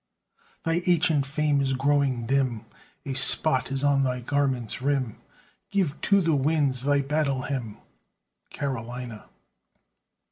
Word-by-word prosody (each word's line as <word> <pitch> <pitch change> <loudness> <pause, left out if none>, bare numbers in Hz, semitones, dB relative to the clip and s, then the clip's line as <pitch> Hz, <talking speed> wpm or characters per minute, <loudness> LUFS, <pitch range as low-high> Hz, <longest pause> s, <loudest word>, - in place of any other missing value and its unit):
Thy 165 +1 0
ancient 160 -5 +2
fame 145 0 0
is 135 -1 0
growing 135 -3 0
dim, 130 -3 -1 0.4
A 135 - -3
spot 130 0 +5
is 135 0 -2
on 140 -1 +3
thy 125 -2 -1
garment's 130 -3 -1
rim; 135 -4 -1 0.5
Give 185 -7 -1
to 200 -1 +3
the 165 -3 +1
winds 140 -2 0
thy 140 +1 +1
battle 140 -2 -1
hymn, 120 -7 -5 0.7
Carolina! 125 -4 -6
135 Hz, 120 wpm, -25 LUFS, 130-145 Hz, 0.7 s, spot